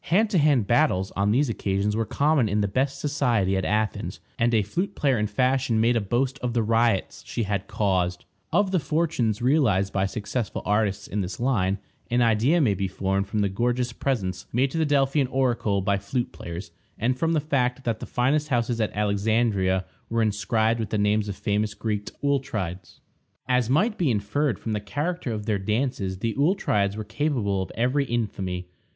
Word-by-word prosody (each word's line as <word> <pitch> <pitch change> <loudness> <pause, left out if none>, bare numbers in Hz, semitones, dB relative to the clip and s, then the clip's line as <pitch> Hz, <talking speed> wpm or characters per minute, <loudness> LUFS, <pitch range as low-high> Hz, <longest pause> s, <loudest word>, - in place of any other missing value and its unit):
Hand 210 +5 +2
to 185 - +3
hand 145 -7 +3
battles 110 -7 +2
on 100 +1 0
these 135 +7 +3
occasions 105 -2 -1
were 115 -1 -1
common 145 -6 +2
in 105 +1 +1
the 100 - +1
best 135 +6 -1
society 120 -10 +1
at 95 - 0
Athens, 105 +2 -1 0.2
and 120 +1 +3
a 110 -3 +3
flute 180 - -3
player 135 -5 +2
in 105 - +1
fashion 125 +2 +1
made 115 +2 +3
a 115 - +2
boast 125 +6 -1
of 125 -3 -3
the 115 - +2
riots 115 -3 +1
she 115 - -2
had 100 -1 -2
caused. 90 -3 0 0.3
Of 205 -2 +2
the 185 - +2
fortunes 140 -8 0
realized 110 -9 +2
by 95 0 +1
successful 105 +3 -3
artists 105 -1 0
in 105 - -2
this 90 -1 -5
line, 100 -7 +1 0.3
an 120 0 +3
idea 115 +9 +3
may 125 -10 +3
be 95 0 -2
formed 95 +1 -1
from 105 +1 -1
the 100 - +2
gorgeous 120 +5 -1
presents 100 -10 -2
made 130 +3 +1
to 165 - -2
the 160 - +2
Delphian 140 -1 +2
oracle 120 -7 +1
by 100 +1 +1
flute 120 +5 -2
players, 85 +1 -7 0.3
and 125 +3 +1
from 165 +5 0
the 160 - +3
fact 135 -3 0
that 115 -3 -1
the - - -7
finest 145 +5 +1
houses 120 -3 0
at 105 -3 -1
Alexandria 100 -2 +1 0.2
were 115 0 +1
inscribed 110 +2 +1
with 110 - -3
the 110 - -1
names 105 0 +1
of 100 - -4
famous 105 +1 -1
Greek 105 -2 -3
auletrides. 110 -11 -2 0.5
As 125 -2 +2
might 205 - +2
be 165 -6 +2
inferred 115 +3 0
from 110 - -4
the 105 - 0
character 145 - -3
of 105 -2 -4
their 105 -2 0
dances, 105 -2 -1
the 115 +3 -2
auletrides 105 - +1
were 110 - -3
capable 110 -4 -1
of 95 - -5
every 130 +4 +1
infamy. 95 -7 -3
115 Hz, 195 wpm, -25 LUFS, 100-135 Hz, 0.5 s, to